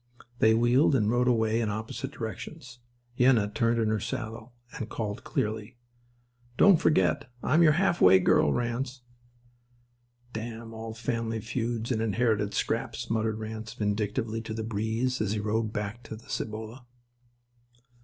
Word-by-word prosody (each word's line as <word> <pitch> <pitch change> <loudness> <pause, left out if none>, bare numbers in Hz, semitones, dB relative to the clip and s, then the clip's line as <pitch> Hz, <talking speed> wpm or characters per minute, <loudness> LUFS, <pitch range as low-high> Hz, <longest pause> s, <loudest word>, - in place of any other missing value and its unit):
They 110 0 +5
wheeled 120 +5 +4
and 110 -4 +2
rode 125 +1 +2
away 115 -1 +2
in 110 - 0
opposite 110 +5 -4
directions. 125 +2 -7 0.4
Yenna 120 -5 +4
turned 115 +1 +2
in 110 -1 +1
her 110 0 +1
saddle 115 0 -5 0.2
and 115 - -5
called 105 -3 -4
clearly: 110 +2 -3 0.8
"Don't 195 -4 +7
forget 95 - +2
I'm 155 +5 +3
your 155 -2 +6
half 175 +1 +1
way 95 +1 +8
girl, 90 -5 +3
Ranse." 120 - -2 1.3
"Damn 115 0 -6
all 110 0 -7
family 115 -2 -2
feuds 115 +1 -3
and 110 -3 0
inherited 110 -2 +1
scraps," - - -2
muttered 110 -1 0
Ranse 110 +1 -6
vindictively 105 +2 -1
to 110 -1 -6
the 110 - -3
breeze 110 +3 -1
as 105 -1 0
he 110 - -1
rode 110 +1 -1
back 105 +2 -4
to 110 - -7
the 110 - -15
Cibolo. 110 +3 -5
115 Hz, 145 wpm, -28 LUFS, 110-120 Hz, 1.3 s, way